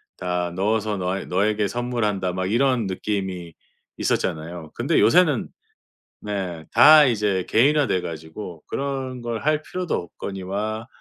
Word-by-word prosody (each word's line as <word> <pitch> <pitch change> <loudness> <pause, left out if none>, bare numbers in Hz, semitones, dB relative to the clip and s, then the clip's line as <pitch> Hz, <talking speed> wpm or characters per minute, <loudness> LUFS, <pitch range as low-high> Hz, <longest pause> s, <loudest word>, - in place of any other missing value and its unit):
다 90 -1 -2
넣어서 105 +2 0
너에 95 0 -2
너에게 105 +3 +1
선물한다.' 105 -4 -1
막 95 0 -2
이런 125 0 +2
느낌이 95 -3 -3 0.4
있었잖아요. 80 0 -2
근데 - - +1
요새는 150 0 +4 0.7
네 95 -6 -4
다 155 +1 +8
이제 105 -6 0
개인화 145 +4 +4
돼 95 - +1
가지고 80 +1 -8
그런 135 -2 -4
걸 120 -2 -4
할 155 0 +2
필요도 180 +1 -3
없거니와 100 +5 -4
105 Hz, 280 characters per minute, -23 LUFS, 90-120 Hz, 0.7 s, 다